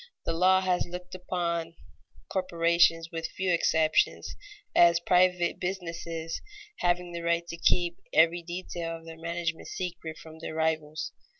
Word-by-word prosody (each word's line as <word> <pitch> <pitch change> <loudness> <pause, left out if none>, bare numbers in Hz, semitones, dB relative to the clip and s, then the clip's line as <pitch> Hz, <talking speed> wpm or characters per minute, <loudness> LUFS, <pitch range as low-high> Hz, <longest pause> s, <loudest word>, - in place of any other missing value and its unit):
_ - - -15 0.2
The - - 0
law 185 +3 +4
has 180 -2 +1
looked 180 +1 -8
upon 170 -2 -2 0.5
corporations, 170 -2 +2
with 165 -1 -3
few 185 -1 -1
exceptions, 160 -2 +2 0.4
as 170 -1 +6
private 180 0 +3
businesses, 170 -3 -4 0.4
having 175 0 +1
the 170 0 -5
right 170 0 0
to - - -4
keep 175 +1 +2
every 170 +2 +4
detail 170 -1 -5
of 165 - -16
their 165 0 -10
management 170 0 -3
secret 170 -3 -5
from 160 0 -12
their 160 - -6
rivals. 160 -1 -1
170 Hz, 140 wpm, -28 LUFS, 165-180 Hz, 0.5 s, as